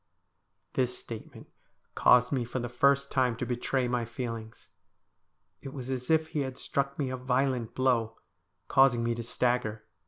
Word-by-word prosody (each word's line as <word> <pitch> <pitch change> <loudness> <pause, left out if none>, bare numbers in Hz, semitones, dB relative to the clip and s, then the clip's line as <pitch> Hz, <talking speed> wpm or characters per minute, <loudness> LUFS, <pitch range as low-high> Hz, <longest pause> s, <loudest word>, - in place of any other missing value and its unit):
This 125 -1 0
statement 115 -2 -9 0.5
caused 125 0 +5
me 130 -4 +1
for 120 +2 -5
the 120 -1 -2
first 140 +3 +2
time 125 -3 +2
to 125 - -2
betray 125 +1 -1
my 120 -1 0
feelings. 115 -2 -6 0.9
It 135 - -8
was 130 -1 -5
as 125 -1 -4
if 160 0 +3
he 155 - -2
had 130 -2 -3
struck 140 0 -2
me 135 -3 -1
a 130 - -3
violent 125 -2 0
blow, 115 -4 +1 0.5
causing 135 -3 +4
me 115 0 +1
to 120 - -4
stagger. 120 -2 -1
125 Hz, 160 wpm, -29 LUFS, 120-135 Hz, 0.9 s, caused